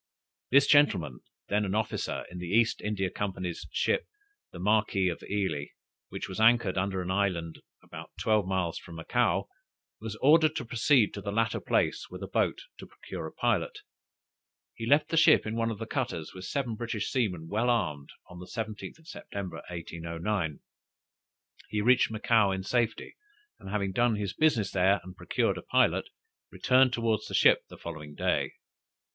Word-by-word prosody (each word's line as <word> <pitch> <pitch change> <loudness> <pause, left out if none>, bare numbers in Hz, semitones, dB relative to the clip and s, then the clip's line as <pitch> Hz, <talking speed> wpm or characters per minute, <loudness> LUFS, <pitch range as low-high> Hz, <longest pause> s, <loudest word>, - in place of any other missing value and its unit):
This 140 +1 +6
gentlemen, 100 - +3 0.3
then 105 +1 +2
an 100 0 -2
officer 110 0 -2
in 90 - -7
the 90 - -5
East 115 +5 +2
India 95 -3 -2
Company's 95 -4 -4
ship - - 0 0.4
the - - -10
Marquis 100 -1 +2
of 85 - -5
Ely, 95 -8 -2 0.4
which - - -5
was 95 - -6
anchored 115 -3 +4
under 95 0 -1
an 90 - -3
island 90 -4 -1 0.2
about - - -10
twelve 105 -3 +2
miles 95 -3 -1
from 85 - -12
Macao, 80 - 0 0.5
was 110 -1 -6
ordered 155 +5 +4
to 125 - -3
proceed 120 -1 +3
to 100 - -6
the 100 - -4
latter 115 +2 0
place - - 0
with - - -8
a - - -4
boat - - 0 0.2
to - - -9
procure - - -8
a - - -9
pilot. 430 -4 -1 0.9
He 115 - -6
left 145 +4 +4
the 165 - 0
ship 160 - +6
in 110 +1 -3
one 115 0 0
of 110 - -4
the 115 - -5
cutters, 115 - -3
with 95 0 -8
seven 130 0 -2
British 115 -1 -3
seamen 90 -11 -1
well 110 +7 0
armed, 80 -12 -1 0.2
on 90 0 -11
the 90 - -9
17th 110 +8 -6
September, 100 - -7
1809. 85 0 -4 1.1
He 105 - -1
reached 120 +3 +4
Macao 110 -1 +2
in 95 0 -2
safety, 115 +2 -1 0.4
and - - -10
having 100 -1 -1
done 120 +3 +2
his 100 -3 -3
business 120 -6 +2
there 95 +2 +3
and 90 +1 -11
procured - - -1
a - - -8
pilot, - - +2 0.4
returned 130 0 +3
towards 115 -3 0
the - - -4
ship - - +5
the - - -11
following 75 -3 -8
day. - - 0
105 Hz, 170 wpm, -29 LUFS, 90-115 Hz, 1.1 s, This